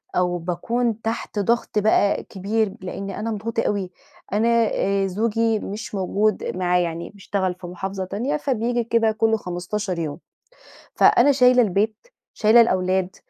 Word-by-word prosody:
أو 180 -1 +1
باكُون 225 +7 -2
تحت 225 -1 -3
ضغْط 225 +1 +1
بقى 205 -1 +2
كبير 205 +1 -2
لإني 195 +2 -6
أنا 225 +2 -2
مضغوطة 225 +2 -2
أوي، 195 -3 -2 0.4
أنا 215 +3 +2 0.3
آآ 195 0 +1
زوجي 225 +3 0
مش 210 +1 -6
موجود 200 +2 0
معايا 180 -1 +2
يعني 170 0 -4
بيشتغل 195 -2 -3
في 180 0 -10
محافظة 190 +2 -5
تانية 250 +11 -2
فبييجي 245 -4 -1
كده 230 -1 +2
كُلّ 225 +1 +1
15 180 0 -4
يوم. 155 -3 -4 0.8
فأنا 265 +4 +5
شايلة 250 -2 +5
البيت، 215 - -1 0.3
شايلة 220 +2 +5
الأولاد، 185 -3 +1
205 Hz, 140 wpm, -22 LUFS, 185-225 Hz, 0.8 s, فأنا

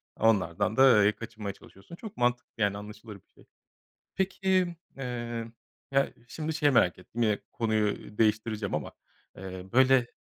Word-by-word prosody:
onlardan 100 -2 +2
da, 130 -6 +7
eee, 105 - +5
kaçınmaya 110 -2 -7
çalışıyorsun. 95 - -14
Çok 215 +3 -10
mantıklı, 120 0 0
yani, 100 -2 +1
anlaşılır 105 +1 -9
bir 100 - -19
şey. - - -20 0.7
Peki, 190 -2 +1 0.2
eee, 120 -3 -4 0.4
ya, 135 0 +2
şimdi 160 +4 -4
şeyi 150 -2 +3
merak 90 -8 +4
ettim; 115 +6 -6
yine 105 -2 +2
konuyu 110 -2 -1
değiştireceğim 110 -3 +1
ama, 75 - -4 0.5
eee, 95 -1 -7
böyle, 130 -1 +5
115 Hz, 140 wpm, -29 LUFS, 105-130 Hz, 0.7 s, da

